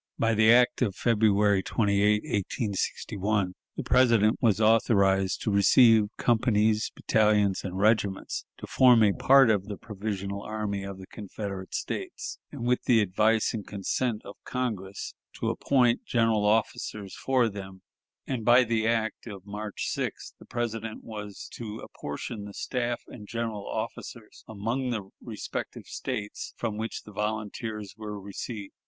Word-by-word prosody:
By 115 Hz, 0 st, +2 dB
the 110 Hz, +1 st, +5 dB
act 125 Hz, +2 st, +4 dB
of 105 Hz, -7 st, +1 dB
February 105 Hz, -3 st, +3 dB
28, 105 Hz, 0 st, +2 dB
1861, 100 Hz, -1 st, -1 dB, 0.2 s
the -, -, -2 dB
President 115 Hz, -4 st, +4 dB
was 110 Hz, -4 st, +3 dB
authorized 100 Hz, -4 st, +3 dB
to 105 Hz, -, 0 dB
receive 110 Hz, +2 st, +6 dB
companies, 110 Hz, -2 st, +2 dB
battalions, 105 Hz, -3 st, +2 dB
and 95 Hz, -1 st, -5 dB
regiments 100 Hz, -1 st, +1 dB
to -, -, -8 dB
form 125 Hz, -3 st, +5 dB
a 100 Hz, -2 st, +4 dB
part 135 Hz, 0 st, +6 dB
of 100 Hz, -3 st, 0 dB
the 105 Hz, -1 st, -6 dB
provisional 100 Hz, -2 st, -4 dB
army 105 Hz, -2 st, -3 dB
of 100 Hz, -1 st, -6 dB
the 95 Hz, -, -10 dB
Confederate 100 Hz, -1 st, -6 dB
States, -, -, -4 dB
and, 120 Hz, -, -6 dB
with 125 Hz, +1 st, +2 dB
the 120 Hz, -3 st, +5 dB
advice 105 Hz, +2 st, +2 dB
and 105 Hz, -4 st, -5 dB
consent 105 Hz, +3 st, -2 dB
of 100 Hz, -, -10 dB
Congress, 105 Hz, -7 st, -4 dB, 0.2 s
to -, -, -1 dB
appoint 125 Hz, -4 st, +2 dB
general 115 Hz, -3 st, +2 dB
officers 105 Hz, -2 st, -1 dB
for 130 Hz, -3 st, +2 dB
them; 95 Hz, -3 st, -8 dB, 0.4 s
and 125 Hz, -4 st, -3 dB
by 120 Hz, +2 st, +6 dB
the 115 Hz, -2 st, 0 dB
act 115 Hz, 0 st, -1 dB
of 100 Hz, -3 st, -9 dB
March 105 Hz, 0 st, -5 dB
6th -, -, -4 dB
the -, -, -14 dB
President 115 Hz, -2 st, -4 dB
was 105 Hz, -3 st, -8 dB
to 110 Hz, -2 st, -6 dB
apportion 110 Hz, -1 st, -6 dB
the 100 Hz, -, -10 dB
staff 120 Hz, -2 st, -2 dB
and 105 Hz, -4 st, -11 dB
general 115 Hz, -3 st, -4 dB
officers -, -, -6 dB
among 115 Hz, +5 st, -2 dB
the 105 Hz, -5 st, -4 dB
respective -, -, -6 dB
States 105 Hz, 0 st, -5 dB
from 115 Hz, -3 st, -2 dB
which 110 Hz, +1 st, -4 dB
the 105 Hz, -, -12 dB
volunteers 105 Hz, 0 st, -4 dB
were 105 Hz, -1 st, -6 dB
received. 100 Hz, +1 st, -7 dB
105 Hz, 145 wpm, -27 LUFS, 100-115 Hz, 0.4 s, receive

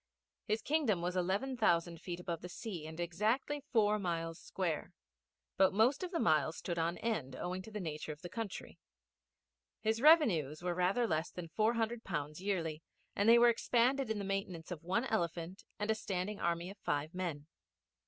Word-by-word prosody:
His 215 Hz, 0 st, 0 dB
Kingdom 260 Hz, -, +1 dB
was 180 Hz, +1 st, -1 dB
eleven 195 Hz, +9 st, 0 dB
thousand 170 Hz, -7 st, +2 dB
feet 175 Hz, -1 st, -5 dB
above 170 Hz, -2 st, -4 dB
the 180 Hz, -, -7 dB
sea 175 Hz, -3 st, -6 dB
and 160 Hz, +1 st, -9 dB
exactly 215 Hz, -, 0 dB
four 215 Hz, -3 st, +3 dB
miles 165 Hz, -3 st, -2 dB
square; 175 Hz, -1 st, -3 dB, 0.6 s
but 190 Hz, 0 st, +4 dB
most 235 Hz, -, +4 dB
of 365 Hz, -, -3 dB
the 345 Hz, -2 st, -2 dB
miles 160 Hz, -5 st, +2 dB
stood 170 Hz, -2 st, -3 dB
on 170 Hz, +2 st, 0 dB
end 155 Hz, -, -2 dB
owing 180 Hz, +1 st, -3 dB
to 190 Hz, -, -10 dB
the 210 Hz, -1 st, -5 dB
nature 155 Hz, -3 st, -4 dB
of 150 Hz, +3 st, -10 dB
the -, -, -4 dB
country. 220 Hz, +1 st, -6 dB, 1.0 s
His 220 Hz, +1 st, 0 dB
revenues 185 Hz, -, +5 dB
were 180 Hz, -1 st, 0 dB
rather 185 Hz, +7 st, +2 dB
less 160 Hz, -4 st, 0 dB
than 175 Hz, -2 st, -7 dB
four 215 Hz, +7 st, +2 dB
hundred 230 Hz, +1 st, -1 dB
pounds 150 Hz, -2 st, -4 dB
yearly, 165 Hz, -6 st, -1 dB, 0.3 s
and 205 Hz, +3 st, +3 dB
they 235 Hz, -, +9 dB
were 240 Hz, 0 st, +7 dB
expended 245 Hz, +2 st, +2 dB
in 220 Hz, -, 0 dB
the 200 Hz, -, -3 dB
maintenance 190 Hz, -4 st, -3 dB
of 165 Hz, -4 st, -5 dB
one 190 Hz, +8 st, 0 dB
elephant 175 Hz, -5 st, -2 dB
and 210 Hz, +1 st, 0 dB
a -, -, +4 dB
standing 200 Hz, -1 st, -3 dB
army 170 Hz, +2 st, -1 dB
of 200 Hz, -, -14 dB
five 145 Hz, -1 st, -1 dB
men. 170 Hz, -6 st, -3 dB
185 Hz, 185 wpm, -35 LUFS, 170-220 Hz, 1.0 s, they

